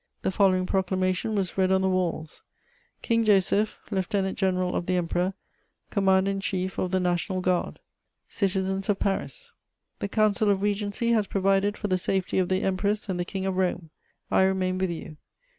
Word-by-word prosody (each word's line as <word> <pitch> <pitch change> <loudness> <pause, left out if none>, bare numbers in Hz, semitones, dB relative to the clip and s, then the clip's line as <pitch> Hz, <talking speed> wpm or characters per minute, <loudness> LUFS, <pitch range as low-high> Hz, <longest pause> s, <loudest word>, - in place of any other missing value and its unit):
The - - +1
following 185 -2 +3
proclamation 185 +2 0
was 195 -1 -2
read 190 0 +3
on 190 0 +3
the - - +2
walls: 175 -4 -2 0.6
"KING 230 0 +2
JOSEPH, 205 0 +2
LIEUTENANT 190 0 -1
GENERAL 185 -2 0
OF 175 - -2
THE 185 - +1
EMPEROR, 180 +2 -1 0.6
COMMANDER 195 -1 +3
IN 195 - -2
CHIEF 190 -1 -2
OF 185 - 0
THE 185 0 +1
NATIONAL 180 +1 -1
GUARD. 180 -1 0 0.5
"CITIZENS 190 0 -1
OF 205 - +2
PARIS, 475 - -3 0.5
"The - - -2
Council 215 0 +2
of 200 -1 +1
Regency 205 +2 -1
has 215 -3 +2
provided 195 +1 +1
for 210 - -3
the 185 -2 +1
safety 190 0 0
of 180 - +1
the 185 0 +1
Empress 200 +2 -1
and 180 -2 -2
the 175 - -1
King 190 +1 -4
of 190 -1 -1
Rome: 180 -3 -1 0.4
I - - +4
remain 185 -1 +1
with 190 -1 0
you. 160 -2 -7
190 Hz, 175 wpm, -26 LUFS, 185-200 Hz, 0.6 s, I